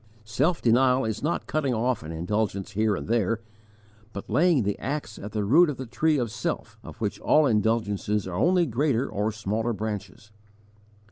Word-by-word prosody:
Self 140 +10 0
denial 125 +2 +4
is 110 0 -3
not 155 +4 -1
cutting 140 -5 -1
off 120 +1 0
an 80 +1 -7
indulgence 100 +4 -2
here 110 0 +1
and - - -6
there, 115 -1 +1 0.7
but 100 +1 -7
laying 150 +1 +3
the 100 0 -1
axe 130 -4 -4
at 105 - -7
the 105 0 -1
root 155 - +5
of 140 - -4
the 130 - -5
tree 150 +6 +1
of 120 -5 -1
self, - - -4
of - - -10
which - - -2
all 155 0 +4
indulgences 105 -3 0
are 95 - -6
only 175 - +3
greater 135 -1 0
or 105 +2 -1
smaller 110 +2 -2
branches. 105 -1 -6
115 Hz, 180 wpm, -26 LUFS, 105-135 Hz, 0.7 s, root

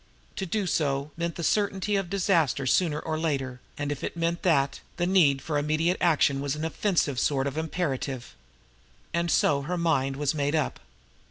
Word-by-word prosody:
To 190 - -2
do 205 +3 -1
so 145 -4 0
meant 170 0 -3
the 170 - -5
certainty 205 +1 +1
of 195 -3 -1
disaster 170 - +1
sooner 150 +3 +2
or 155 0 -3
later, 135 -6 -2 0.2
and 145 0 -2
if 145 - -5
it - - -4
meant 170 +1 0
that, 140 -6 +2 0.2
the 175 - +1
need 160 -8 +4
for 150 -2 0
immediate 155 +4 +1
action 140 -5 +3
of 140 0 -1
an 155 +1 -3
offensive 160 - 0
sort 135 -2 +1
was 140 0 -3
imperative. 145 -6 -3 0.8
And 170 +1 0
so 145 -3 +3
her 175 +6 -3
mind 145 -6 +1
was 145 0 0
made 145 0 0
up. 155 - -1
155 Hz, 180 wpm, -27 LUFS, 140-170 Hz, 0.8 s, need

